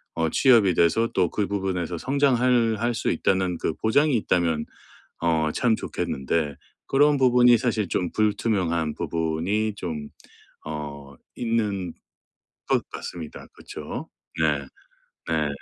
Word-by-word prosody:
어 80 -1 +1
취업이 115 - +5
돼서 85 +8 +3
또 90 -3 +2
그 105 -2 -1
부분에서 90 -3 -2
성장할 125 - +2
할 120 +1 0
수 - - -1
있다.‘는 95 -2 +1
그 80 - -2
보장이 140 - +2
있다면 85 -7 0 0.6
어 80 -2 +2
참 115 +3 +2
좋겠는데 75 -2 -2 0.3
그런 145 +2 +4
부분이 125 -2 +6
사실 110 -3 0
좀 90 0 -1
불투명한 100 -7 0
부분이 85 +7 -1
좀 80 -6 -5 0.6
어 70 -2 -7 0.2
있는 105 -6 -1 0.8
것 - - +1
같습니다. 80 -3 -8
그쵸. - - -8 0.3
네. 75 -3 +2 0.7
네. 80 -2 +1
95 Hz, 235 characters per minute, -25 LUFS, 80-115 Hz, 0.8 s, 부분이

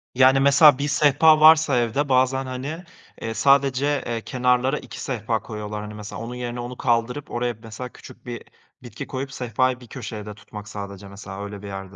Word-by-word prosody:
Yani 130 +1 +6
mesela 140 +1 +6
bir 140 +1 -2
sehpa 150 +1 +5
varsa 155 -3 +6
evde 120 +5 0
bazen, 130 +1 +2
hani, 135 +7 -5 0.4
eee, 115 - -3
sadece, 140 +2 +2
eee, 115 -1 -2
kenarlara 125 +3 +1
2 - - -10
sehpa 115 -3 -2
koyuyorlar 105 -1 -6
hani. 105 0 -8
Mesela 105 +1 -8
onun 120 +2 -6
yerine, 120 0 -5
onu 120 +1 -6
kaldırıp 120 +4 -1
oraya, 120 0 -1
mesela, 115 +3 -7
küçük - - -15
bir 120 -1 -6 0.4
bitki 120 - -8
koyup 135 +1 -5
sehpayı 125 +1 0
bir 125 - -14
köşede 105 -4 -7
tutmak 105 -1 -11
sadece 100 -1 -8
mesela 100 0 -8
öyle 100 -1 -7
bir 100 - -8
yerde. 95 0 -8
125 Hz, 180 wpm, -23 LUFS, 110-135 Hz, 0.4 s, Yani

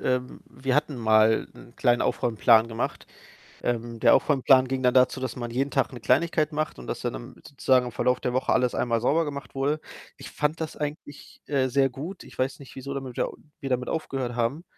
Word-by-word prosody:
ähm, 125 0 -2
wir 130 -1 -2
hatten 150 -2 0
mal 110 -1 +3
'n 120 - -15
kleinen 120 -2 +3
Aufräumplan 115 0 +3
gemacht. 115 -1 -4 0.6
Ähm, 115 -1 -2
der - - +6
Aufräumplan 130 -2 +4
ging 130 0 -2
dann 125 0 +4
dazu, 130 +1 +4
dass 130 -2 -4
man 120 -2 -5
jeden 135 +4 -1
Tag 135 - +1
'ne 120 - -8
Kleinigkeit 155 +5 +2
macht 155 0 -2
und 60 - -10
dass - - -4
dann - - -2
am - - -9
sozusagen 130 -2 +2
im - - -5
Verlauf 125 +2 +1
der 125 - -2
Woche 130 - +1
alles 125 -1 +1
einmal 115 -2 0
sauber 160 +7 +2
gemacht 140 -2 -7
wurde. 140 +3 0 0.4
Ich - - -9
fand 150 +2 -1
das 160 - -4
eigentlich, 145 -1 -7
äh, 135 -3 +1
sehr 135 +1 +2
gut. 155 +9 -7
Ich - - -15
weiß 130 +1 -1
nicht, 140 - -13
wieso 135 +1 -6
damit 135 -3 -6
ja, - - +1 0.3
wir 135 - -5
damit 125 -1 -1
aufgehört 135 -6 -3
haben. 125 +8 -1
130 Hz, 210 wpm, -26 LUFS, 120-140 Hz, 0.6 s, der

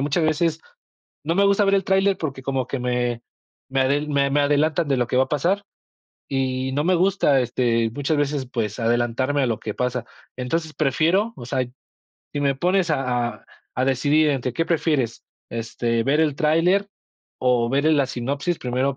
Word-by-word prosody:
muchas 145 +4 +1
veces, 160 +1 +1 0.6
no 165 +2 0
me 200 +2 +3
gusta 200 +1 +3
ver 195 0 +3
el 195 -1 +1
tráiler, 195 0 +2
porque 135 -4 -4
como 130 -1 -2
que 135 +1 -3
me 125 -1 -1 0.5
me 135 0 0
adel 145 +3 0
me 140 -1 +1
me 145 +1 +2
adelantan 150 +3 +2
de 135 - +2
lo 120 - +1
que 125 - -2
va 130 - +5
a - - -15
pasar, 175 +8 0 0.6
y 130 -1 -1
no 145 +2 0
me 180 +3 +3
gusta, 180 -6 +3
este, 115 -2 0
muchas 145 +3 -1
veces, 145 -2 -1
pues 115 -3 -3
adelantarme 120 +4 +1
a - - +2
lo 115 -2 -1
que 105 - -5
pasa, 125 -1 -2 0.3
entonces 155 +5 -3
prefiero, 165 - +1
o 120 - -9
sea, 130 0 -1 0.7
si 145 - -2
me 140 -1 +2
pones 180 +4 +1
a 150 - +2 0.4
a - - -28 0.3
a 130 - +2
decidir 145 +4 +2
entre 130 -3 -2
qué 165 - 0
prefieres, 150 -8 0 0.3
este, 115 0 -1
ver 140 +5 +2
el 155 -3 +2
tráiler 165 +7 +2 0.5
o 125 -2 +2
verle 140 +5 +2
la 140 -3 +3
sinopsis, 140 +7 -2
primero 130 +2 -1
140 Hz, 185 wpm, -23 LUFS, 125-160 Hz, 0.7 s, va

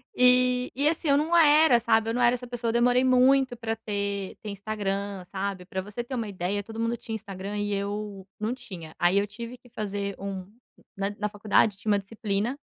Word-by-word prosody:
E 250 0 +4
e 280 +3 +2
assim 315 -1 0
eu 280 - +5
não 320 +3 +1
era, 300 -5 +6
sabe. 225 -1 +2
Eu - - 0
não 245 - 0
era 240 0 +5
essa 250 0 -8
pessoa, 240 -1 -2
demorei 245 +2 +3
muito 255 0 +4
para 225 -1 -2
ter 200 -3 -3
ter 215 - -6
Instagram, 200 -2 -3
sabe? 195 -2 -3
Pra 190 0 -3
você 210 +5 -6
ter 260 +2 -5
uma 230 -3 -2
ideia 195 +2 -2
todo 225 +2 -8
mundo 230 +1 0
tinha 225 -1 -6
Instagram 200 -1 -6
e 205 0 -1
eu 200 -1 -4
não 215 +3 -1
tinha, 170 -10 -9
aí 175 +3 +3
eu 200 - -1
tive 235 +4 -8
que 245 - -21
fazer 200 -3 -3
um 195 -2 -5 0.5
na 195 +1 0
na 210 - 0
faculdade 210 0 +2
tinha 215 +1 -1
uma 205 - +4
disciplina, 210 +4 -2
215 Hz, 210 wpm, -27 LUFS, 200-245 Hz, 0.5 s, era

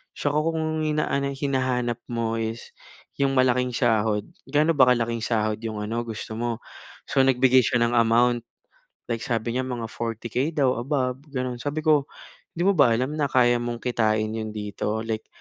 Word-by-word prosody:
tsaka 145 0 -1
kung 160 +1 -1
ang 155 0 -1
inaanay 145 -2 0
hinahanap 130 -4 0 0.2
mo 115 -1 -1
is 115 +1 -4 0.5
yung 140 -1 +1
malaking 125 0 +3
sahod, 110 -4 +1 0.2
gaano 150 +4 +3
ba 130 -2 +6
kalaking 115 -1 -2
sahod 110 -2 0
yung 110 -2 -4
ano 115 +3 -2
gusto 110 -1 -6
mo? 120 -1 -2 0.5
So, 135 - +2
nagbigay 130 0 +5
siya 120 - +1
ng 120 +1 +2
amount, 120 +1 +3 0.7
like 115 -1 -1
sabi 115 +1 -2
niya 130 - 0
mga 120 -3 -4
40k 115 +4 -2
daw 135 -5 +2
above 130 -1 -1
ganoon. 125 -2 -2
Sabi 145 +3 -2
ko 150 -3 +4 0.5
'di 175 - 0
mo - - +6
ba 130 -6 +6
alam 130 +5 -1
na 150 -2 +1
kaya 120 -1 +4
mong 120 0 -4
kitain 110 -3 +1
iyon 110 -1 -4
dito 105 +1 -3
like 110 -1 -4
120 Hz, 170 wpm, -25 LUFS, 115-135 Hz, 0.7 s, ba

